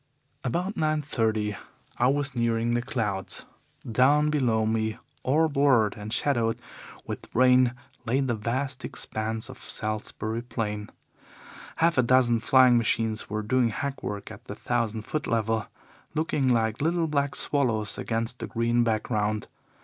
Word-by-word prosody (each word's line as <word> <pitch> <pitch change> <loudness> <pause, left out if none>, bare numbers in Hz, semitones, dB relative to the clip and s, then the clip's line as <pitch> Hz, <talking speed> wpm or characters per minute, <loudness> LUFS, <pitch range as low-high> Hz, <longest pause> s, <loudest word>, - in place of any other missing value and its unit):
"About 180 - -1
nine 155 -1 0
thirty 110 -6 0 0.4
I 120 - +4
was 140 +1 +1
nearing 115 0 +1
the 120 - +1
clouds. 105 -6 -2 0.4
Down 140 +6 +4
below 120 -7 +2
me, 110 0 0 0.2
all 155 +5 +3
blurred 135 -7 +3
and 105 0 -7
shadowed 115 -3 +1 0.5
with - - -6
rain, 125 0 +5 0.3
lay 125 +3 +1
the 130 -3 0
vast 130 +5 -2
expanse 110 +1 -3
of - - -10
Salisbury 110 +1 -3
Plain. 105 -3 -4 0.9
Half 165 -3 +2
a - - +8
dozen 120 -1 +4
flying 130 0 +5
machines 110 -1 0
were 105 +1 -2
doing 120 +2 +2
hackwork 115 -5 -4
at - - -12
the - - -7
thousand 115 -3 -1
foot 155 +6 -3
level, 115 -2 0 0.5
looking 150 -3 0
like 115 -2 +1
little 165 +2 +1
black 140 -3 0
swallows 115 -7 0
against 115 +2 -2
the - - -4
green 120 +1 +1
background. 110 -1 0
120 Hz, 140 wpm, -27 LUFS, 110-135 Hz, 0.9 s, a